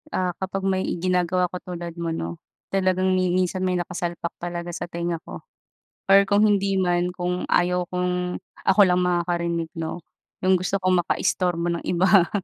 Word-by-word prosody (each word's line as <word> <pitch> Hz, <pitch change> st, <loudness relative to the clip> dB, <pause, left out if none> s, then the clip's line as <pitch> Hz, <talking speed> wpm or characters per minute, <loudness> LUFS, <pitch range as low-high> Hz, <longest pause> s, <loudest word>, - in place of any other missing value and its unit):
Ah, 180 Hz, -7 st, -1 dB
kapag 190 Hz, 0 st, -3 dB
may 190 Hz, -1 st, +1 dB, 0.2 s
ginagawa 180 Hz, 0 st, +1 dB
ako 180 Hz, +1 st, -5 dB, 0.2 s
tulad 170 Hz, 0 st, -6 dB
mo 170 Hz, -, -1 dB
'no, 85 Hz, -, -4 dB, 0.3 s
talagang 185 Hz, -1 st, +2 dB
mi 185 Hz, -1 st, +2 dB
minsan 185 Hz, +1 st, 0 dB
may 185 Hz, -1 st, +1 dB
nakasalpak 175 Hz, -1 st, -3 dB
talaga 175 Hz, 0 st, -4 dB
sa 175 Hz, -, -5 dB
tenga 170 Hz, -1 st, -3 dB
ko, -, -, -10 dB, 0.6 s
or 195 Hz, 0 st, +7 dB
kung 205 Hz, +1 st, +4 dB
hindi 200 Hz, -2 st, +2 dB
man 175 Hz, -1 st, +1 dB
kung 180 Hz, 0 st, -2 dB
ayaw 180 Hz, 0 st, +2 dB
kong 180 Hz, 0 st, -1 dB, 0.2 s
ako 195 Hz, +2 st, +4 dB
lang 180 Hz, 0 st, +2 dB
makakarinig 170 Hz, -2 st, 0 dB
'no, 165 Hz, 0 st, -4 dB, 0.5 s
'yung 190 Hz, -, +5 dB
gusto 185 Hz, +2 st, +1 dB
kong 185 Hz, -2 st, +2 dB
makaistorbo 175 Hz, 0 st, 0 dB
ng -, -, -13 dB
iba 180 Hz, 0 st, +4 dB
180 Hz, 165 wpm, -24 LUFS, 175-185 Hz, 0.6 s, or